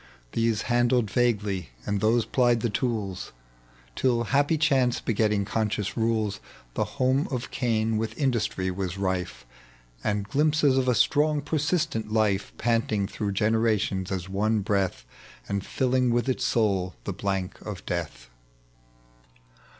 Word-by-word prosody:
1 - - -23 0.2
These 115 -2 +1
handled 120 -2 +2
vaguely, 105 - 0 0.2
and 100 -1 -1
those 115 +1 +3
plied 120 -3 +2
the 120 - 0
tools, 105 -6 -2 0.6
Till, 120 -3 +2
happy 145 +6 +2
chance 135 -5 +2
begetting 105 -2 +1
conscious 105 -1 -1
rules, 110 -3 0 0.3
The - - 0
home 130 +2 +2
of 125 -2 -4
Cain 115 -3 0
with 110 0 -3
indnstry 110 -9 0
was 95 -1 -3
rife, 95 -8 -2 0.6
And 105 -1 -1
glimpses 150 0 +3
of 130 -1 +1
a 125 - +3
strong 150 +3 +3
persistent 145 -7 -1
life, 105 -3 +1
Panting 115 -3 +1
through 100 -2 -3
generations 105 -3 +1
as 95 -1 -3
one 105 +3 +1
breath, 100 -2 -1 0.4
And 100 -1 -2
filling 130 +1 +1
with 120 +2 +1
its 130 - 0
soul 95 -5 +1
the 100 - -3
blank 95 -1 -3
of 105 -4 -7
death. 70 -9 -4
110 Hz, 135 wpm, -26 LUFS, 100-125 Hz, 0.6 s, those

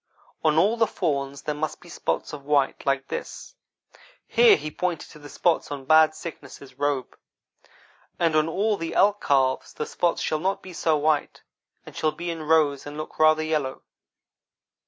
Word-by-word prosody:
On 155 -1 +3
all 205 +8 +3
the 225 -1 +3
fawns 140 -5 -2
there 150 - -2
must 155 +1 -4
be - - -17
spots 170 - -3
of 145 -2 -7
white 140 -1 0
like 135 0 +1
this - - -7 0.7
(here 470 -3 +6
he 155 - -6
pointed 175 0 -3
to 150 - -14
the 145 0 -11
spots 170 -2 0
on 140 -2 -6
Bad 155 +1 +5
Sickness's 140 -5 -10
robe) 145 -3 -1 1.0
and 165 -2 +1
on 155 +1 +3
all 210 +6 +1
of 205 - -3
the 165 0 -4
elk 205 +1 +3
calves 130 -2 +1
the 150 - -4
spots 175 -1 0
shall 155 - 0
not 190 +4 -1
be 185 - -10
so 160 -2 +1
white 150 0 0 0.4
and - - -12
shall 155 - +1
be 170 +3 -5
in 165 -1 -6
rows 150 -3 +2
and 145 +1 -8
look 155 - -7
rather 155 0 +5
yellow.' 150 -4 -2
155 Hz, 180 wpm, -25 LUFS, 145-170 Hz, 1.0 s, here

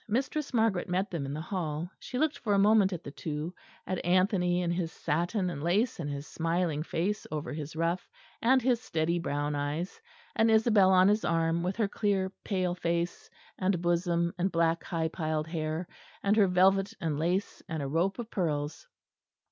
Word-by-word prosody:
Mistress 265 +6 -1
Margaret 220 -7 +1
met 185 +3 0
them 155 -6 -3
in 140 - -4
the - - -4
hall. 170 -2 -3
She 250 - -6
looked 310 +2 +1
for 210 -3 +1
a - - +3
moment 205 -1 +5
at 175 -2 -5
the 140 - -7
two; 155 +3 -4 0.3
at 185 - -3
Anthony 180 -1 +2
in 170 - 0
his 170 -2 -1
satin 175 +5 -1
and 140 - -6
lace 190 - +1
and 150 -3 -3
his 140 0 -5
smiling 165 -2 -1
face 185 +6 -2
over 155 0 -4
his 150 0 -6
ruff 170 +2 -1 0.3
and 255 +2 +4
his 245 -2 +2
steady 170 -5 0
brown 145 -2 -1
eyes; 145 - -3 0.3
and 225 0 +4
Isabel 220 -3 +5
on 185 0 +6
his 210 +2 +3
arm, 165 0 +1
with 180 +2 -1
her 220 -2 +1
clear 195 -2 0
pale 185 -3 0
face 170 -1 -2 0.3
and 185 -1 +1
bosom 170 0 +1
and 185 +2 +1
black 165 -1 +1
high 165 -3 -1
piled 155 -2 -2
hair, 160 +1 -3 0.4
and 200 +1 +3
her 205 -3 +5
velvet 190 +2 +3
and 160 -5 -1
lace, 180 +5 -1
and 160 -3 -3
a - - -2
rope 170 +7 0
of 240 -2 -6
pearls. 150 - -2
175 Hz, 190 wpm, -30 LUFS, 160-195 Hz, 0.4 s, on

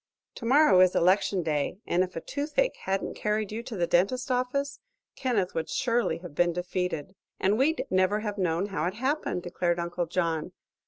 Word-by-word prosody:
Tomorrow 235 -5 +4
is 185 -1 +5
election 185 +1 +3
day, 150 +1 -1
and 180 +1 +2
if 185 -1 -6
a 165 - -3
toothache 315 - -1
hadn't 190 0 -1
carried 210 -1 -1
you 220 +2 -3
to 235 -2 -7
the 175 - +2
dentist's 245 +11 +1
office 255 +3 -1 0.4
Kenneth 220 -8 0
would 165 - -3
surely 240 -1 +1
have 175 -5 -8
been 175 +3 +2
defeated." 180 -1 -3 0.3
"And 195 +2 +2
we'd 290 +7 +1
never 185 +3 +2
have 210 -2 -4
known 180 +2 0
how 165 -5 -2
it 190 - -3
happened," 260 - -1
declared 175 0 -1
Uncle 170 0 -2
John. 165 -2 -1
190 Hz, 175 wpm, -28 LUFS, 175-240 Hz, 0.4 s, is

